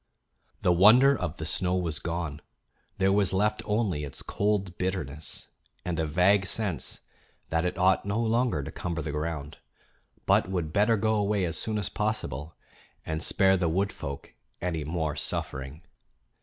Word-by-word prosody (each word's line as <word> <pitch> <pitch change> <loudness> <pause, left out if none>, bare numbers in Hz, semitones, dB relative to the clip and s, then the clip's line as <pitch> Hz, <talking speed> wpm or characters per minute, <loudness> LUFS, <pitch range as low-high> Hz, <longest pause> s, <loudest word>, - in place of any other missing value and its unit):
The 90 - +4
wonder 120 +10 +7
of 90 - -4
the 80 - -5
snow 90 +2 +1
was 85 -4 -1
gone; 85 -3 -4 0.6
there 95 0 +3
was 100 -2 +2
left 105 +3 +1
only 105 -8 0
its 70 - -7
cold 100 -3 -1
bitterness 80 -5 -4 0.4
and 85 -2 -2
a 80 - 0
vague 95 +5 +3
sense 100 -5 -1 0.5
that 80 +1 +1
it 90 - -2
ought 95 +1 +3
no 100 +3 -1
longer 115 - +1
to - - -6
cumber 85 -3 -4
the 75 - -3
ground, 75 0 -4 0.7
but - - +3
would 85 -5 -2
better 110 +2 +3
go 110 +2 +1
away 105 -2 +1
as 80 -2 -3
soon 110 -1 -2
as 105 - -1
possible 105 - -2 0.5
and 80 0 -3
spare 95 +2 +4
the 90 -2 +1
wood 95 +5 0
folk 70 0 -7 0.3
any 85 -3 -2
more 80 -1 -2
suffering. 65 +5 -3
90 Hz, 160 wpm, -28 LUFS, 80-100 Hz, 0.7 s, wonder